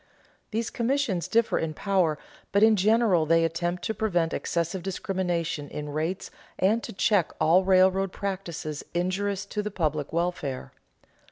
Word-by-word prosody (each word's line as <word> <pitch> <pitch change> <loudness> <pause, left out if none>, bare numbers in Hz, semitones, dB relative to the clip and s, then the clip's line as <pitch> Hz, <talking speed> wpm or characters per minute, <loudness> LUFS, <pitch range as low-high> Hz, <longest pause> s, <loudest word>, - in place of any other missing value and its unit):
These 225 +1 -2
commissions 235 -7 0
differ 230 0 +2
in 155 -1 -3
power, 185 -6 +1 0.3
but 200 +1 +4
in 220 0 +6
general 205 -5 +3
they 165 +1 +4
attempt 175 +2 -2
to 220 - -1
prevent 175 -7 0
excessive 170 +2 -2
discrimination 175 -5 -2
in 150 0 -5
rates 160 +5 -3 0.3
and 210 +5 +2
to - - -7
check 195 -3 +2
all 165 +4 +4
railroad 190 0 +4
practices 175 -7 -4
injurious 190 +2 -1
to 210 +1 -3
the 210 - -3
public 155 -7 -2
welfare. 165 -6 -2
185 Hz, 145 wpm, -27 LUFS, 165-200 Hz, 0.3 s, in